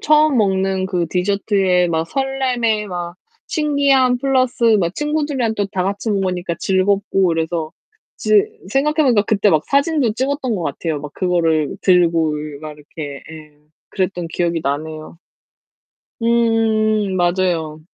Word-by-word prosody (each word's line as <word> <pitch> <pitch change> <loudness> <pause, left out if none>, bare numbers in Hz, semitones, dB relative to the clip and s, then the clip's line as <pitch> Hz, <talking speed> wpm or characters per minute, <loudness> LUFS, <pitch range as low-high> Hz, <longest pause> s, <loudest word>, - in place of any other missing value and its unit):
처음 305 -2 +3
먹는 190 -2 +1
그 180 -3 -1
디저트에 190 -1 +1
막 160 0 -1
설렘에 255 -5 -1
막 175 -2 -6 0.3
신기함 280 -4 +2
플러스 255 -2 0 0.2
막 175 -1 -1
친구들이랑 295 -6 -1
또 205 - 0
다 185 - -1
같이 200 +4 -2
먹으니까 185 -3 -1
즐겁고 195 0 +1
그래서 165 -1 -2 0.4
지 - - -5 0.4
생각해 300 +3 +1
보니까 240 -7 +3
그때 205 0 +2
막 155 -1 +2
사진도 280 -4 +1
찍었던 260 +1 -2
것 185 - -3
같아요. 155 0 -3
막 150 0 -8
그거를 165 -5 0
들고 165 -4 +3
이 150 -1 -7
막 155 -1 -8
이렇게 145 -1 -9
예 155 -2 -12 0.3
그랬던 180 -3 -2
기억이 170 -1 -1
나네요. 155 +3 -4 1.0
음 220 -3 +1
맞아요. 175 -3 0
190 Hz, 285 characters per minute, -18 LUFS, 165-235 Hz, 1.0 s, 처음